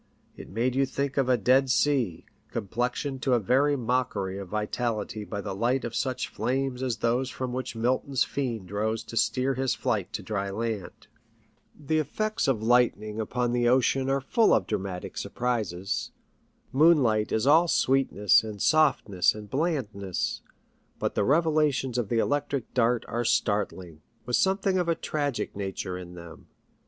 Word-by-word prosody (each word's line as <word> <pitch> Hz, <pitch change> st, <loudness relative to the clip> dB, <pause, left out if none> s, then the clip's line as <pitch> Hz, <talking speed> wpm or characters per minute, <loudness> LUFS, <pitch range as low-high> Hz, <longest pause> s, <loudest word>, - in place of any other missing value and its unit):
It -, -, -11 dB
made 120 Hz, +5 st, 0 dB
you 135 Hz, +1 st, +2 dB
think 140 Hz, +1 st, -2 dB
of 135 Hz, -2 st, +2 dB
a 125 Hz, -, +4 dB
dead 130 Hz, +5 st, +3 dB
sea, 130 Hz, -, +1 dB, 0.2 s
com 110 Hz, -3 st, -4 dB
plexioned 125 Hz, +4 st, -2 dB
to 130 Hz, -1 st, +2 dB
a -, -, +2 dB
very 135 Hz, +7 st, +2 dB
mockery 115 Hz, -6 st, -1 dB
of 100 Hz, -, -7 dB
vitality 110 Hz, +1 st, -2 dB
by 100 Hz, 0 st, -5 dB
the 95 Hz, -, -5 dB
light 120 Hz, +6 st, 0 dB
of 120 Hz, -, -5 dB
such 130 Hz, +1 st, -1 dB
flames 130 Hz, +3 st, -2 dB
as 125 Hz, -4 st, -1 dB
those 120 Hz, +4 st, 0 dB
from 130 Hz, -1 st, -4 dB
which 130 Hz, -1 st, -4 dB
Milton's 130 Hz, +3 st, +1 dB
Fiend 115 Hz, -9 st, -4 dB
rose 110 Hz, +2 st, -1 dB
to 115 Hz, -, -10 dB
steer 130 Hz, +4 st, +1 dB
his 130 Hz, -1 st, 0 dB
flight 100 Hz, -3 st, -1 dB
to 105 Hz, -, -4 dB
dry 100 Hz, 0 st, -2 dB
land. 105 Hz, -2 st, -4 dB, 0.7 s
The 155 Hz, +2 st, 0 dB
effects 215 Hz, +7 st, -1 dB
of 120 Hz, -5 st, +1 dB
lightning 110 Hz, -3 st, +2 dB
upon 120 Hz, +2 st, -1 dB
the 120 Hz, 0 st, +2 dB
ocean 130 Hz, +1 st, +2 dB
are 135 Hz, 0 st, +1 dB
full 220 Hz, -, +3 dB
of 95 Hz, -, +1 dB
dramatic 95 Hz, -1 st, -4 dB
surprises. 105 Hz, -7 st, -2 dB, 0.6 s
Moonlight 130 Hz, -8 st, +4 dB
is 110 Hz, -, +1 dB
all 160 Hz, +5 st, +5 dB
sweetness 130 Hz, -, +3 dB
and 105 Hz, -2 st, -7 dB
softness 130 Hz, -, +3 dB
and 105 Hz, -1 st, -10 dB
blandness, 120 Hz, -, -2 dB, 0.6 s
but -, -, -2 dB
the -, -, +1 dB
revelations 150 Hz, -3 st, +2 dB
of 110 Hz, -4 st, -2 dB
the 120 Hz, -, 0 dB
electric 145 Hz, +1 st, -1 dB
dart 120 Hz, -1 st, +2 dB
are 120 Hz, +1 st, -2 dB
startling, 95 Hz, -8 st, -1 dB, 0.2 s
with 120 Hz, 0 st, 0 dB
something 190 Hz, 0 st, +2 dB
of 175 Hz, -1 st, 0 dB
a 165 Hz, -, +2 dB
tragic 145 Hz, -10 st, -3 dB
nature 95 Hz, -2 st, -4 dB
in 90 Hz, -1 st, -8 dB
them. 85 Hz, -1 st, -12 dB
120 Hz, 165 wpm, -27 LUFS, 105-135 Hz, 0.7 s, all